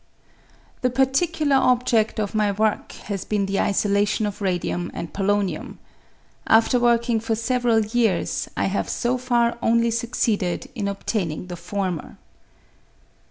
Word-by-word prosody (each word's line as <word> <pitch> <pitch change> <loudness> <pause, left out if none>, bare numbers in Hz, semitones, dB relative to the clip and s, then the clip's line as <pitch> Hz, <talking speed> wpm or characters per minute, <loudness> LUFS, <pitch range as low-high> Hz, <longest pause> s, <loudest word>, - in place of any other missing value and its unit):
The 250 - +2
particular 270 +3 +2
objed 245 -4 +2
of 210 -1 -2
my 210 -1 +2
work 215 +1 0
has 200 -3 -4
been 205 -2 -1
the 195 0 -1
isolation 205 +1 +1
of 205 0 -5
radium 175 -2 -1
and 170 - -6
polonium. 200 0 -1 0.7
After 230 +3 +4
working 235 -1 +2
for 225 0 -1
several 235 0 +1
years, 200 - 0
I - - +1
have 195 +1 -1
so 250 +1 0
far 240 -2 +1
only 235 0 +2
succeeded 230 -1 -1
in 210 -5 -3
obtaining 190 -4 -3
the 175 - -5
former. 180 -1 -4
220 Hz, 130 wpm, -23 LUFS, 200-240 Hz, 0.7 s, After